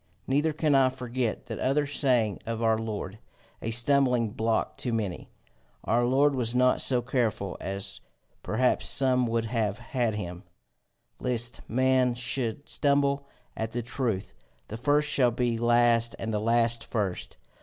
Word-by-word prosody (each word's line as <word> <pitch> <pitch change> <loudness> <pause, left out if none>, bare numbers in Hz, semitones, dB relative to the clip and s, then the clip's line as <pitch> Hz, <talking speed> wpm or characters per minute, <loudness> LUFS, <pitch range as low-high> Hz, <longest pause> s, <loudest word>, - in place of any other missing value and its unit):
Neither 145 +4 +1
can 150 -1 +1
I 135 -1 +5
forget 125 -2 -3
that - - -6
other 145 +3 +1
saying 125 - +1
of 115 0 -3
our 110 -1 +3
Lord, 105 -2 -5 0.4
a 115 - -3
stumbling 120 -1 +3
block 110 +1 -1
to 125 - -3
many 105 -6 -3 0.5
our 120 +4 +2
Lord 140 +3 +3
was 125 -2 -1
not 125 0 +3
so 125 -2 +2
careful 115 -7 -1
as 100 0 -4 0.4
perhaps 130 0 +1
some 130 -2 +3
would 115 0 0
have 110 -3 -1
had 120 -2 -2
him, 90 -4 -5 0.8
lest 120 -1 -1
men 130 0 +2
should 120 +2 -3
stumble 140 -1 +1 0.3
at 110 0 -4
the 120 0 -2
truth 115 -5 -3 0.4
The 110 - -5
first 145 +5 +2
shall 135 -4 +3
be 120 -1 -1
last 120 0 +3
and 110 -1 -4
the 105 - 0
last 115 +1 +2
first. 100 -6 -3
120 Hz, 150 wpm, -27 LUFS, 110-130 Hz, 0.8 s, I